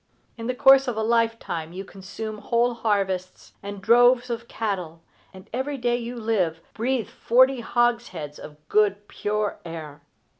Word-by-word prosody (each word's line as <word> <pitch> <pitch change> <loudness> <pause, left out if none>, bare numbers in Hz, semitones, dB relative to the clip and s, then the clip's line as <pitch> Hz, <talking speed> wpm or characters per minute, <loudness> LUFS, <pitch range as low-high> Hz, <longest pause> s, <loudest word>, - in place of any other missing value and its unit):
In 230 -1 -6
the 250 - -1
course 270 +1 +6
of 240 -3 -2
a 220 - 0
lifetime 225 -8 0
you 190 +2 -6
consume 210 +3 -7
whole 240 +2 +1
harvests, 195 -5 -2
and 200 -1 -7
droves 245 +3 +5
of 235 0 -4
cattle, 180 -8 -4 0.3
and 190 0 -14
every 270 +3 -2
day 240 -1 +1
you 240 +1 -6
live 210 -8 0
breathe 245 +1 -1
forty 260 +2 +3
hogsheads 235 - -1
of 150 -1 -11
good 205 -1 +2
pure 210 0 -2
air. 155 -3 -8
220 Hz, 150 wpm, -24 LUFS, 190-240 Hz, 0.3 s, course